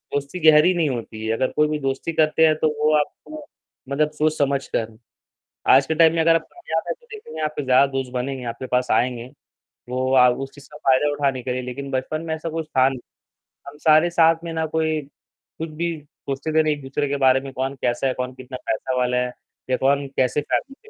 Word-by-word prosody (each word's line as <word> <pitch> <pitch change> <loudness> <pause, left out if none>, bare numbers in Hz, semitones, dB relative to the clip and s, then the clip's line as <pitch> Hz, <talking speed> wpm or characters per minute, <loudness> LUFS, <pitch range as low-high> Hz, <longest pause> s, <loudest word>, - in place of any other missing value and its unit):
दोस्ती 145 +5 -3
गहरी 155 +5 +5
नहीं 165 -4 +1
होती 110 -3 -5
है, 110 - 0
अगर 130 +3 +1
कोई 150 0 +3
भी 150 0 -2
दोस्ती 135 +4 -2
करते 155 +1 +4
हैं 155 - +3
तो 155 - +4 0.2
वो 155 0 +4
आपको 300 - -5 0.4
मतलब 150 +2 +1
सोच-समझ 145 -3 0
कर। 110 -1 -2 0.8
आज 135 +1 +6
के 160 - 0
टाइम 160 0 +5
में 165 - +1
अगर 165 0 +5
आप 165 - +2
कामयाब 350 0 -3
हैं - - -1
तो 475 - -24
देखेंगे 285 - -8
आपके 150 -1 -2
ज्यादा 130 +2 +5
दोस्त 135 -1 -3
बनेंगे, 130 +1 -3
आपके 120 +2 -5
पास 125 0 0
आएँगे, 120 +1 0 0.6
वो 130 +1 -1
अ, 125 -1 +7
उस 135 +2 -3
चीज़ 145 - -14
का 150 - -10
फायदा 135 +1 +3
उठाने 135 -3 0
के 125 - -3
लिए 130 - -2
लेकिन 135 +2 -6
बचपन 135 +4 -2
में 160 - -2
ऐसा 160 +1 -5
कुछ 160 -1 -4
था 130 +1 +6
नहीं, 130 -2 -6 0.7
हम 145 +1 -10
सारे 155 +3 +4
साथ 165 -1 +4
में 165 - -5
ना 160 0 -1
कोई 160 -1 0
कुछ 155 +3 -12
भी 165 +1 -3
सोचते 140 0 -7
ही 155 - -2
नहीं - - -5
थे 155 - +2
एक-दूसरे 140 +1 -3
के 140 - -1
बारे 130 0 +5
में, 135 -1 -8
कौन 135 +2 -3
कैसा 120 +2 0
है, 130 - 0
कौन 125 0 -4
कितना 130 0 -9
पैसा 135 -1 -1
वाला 125 0 +1
है 125 0 0 0.4
या 130 - +2
कौन 140 +1 +1
कैसी 130 +3 +2
फॅमिली 275 - -4
140 Hz, 225 wpm, -22 LUFS, 130-155 Hz, 0.8 s, अ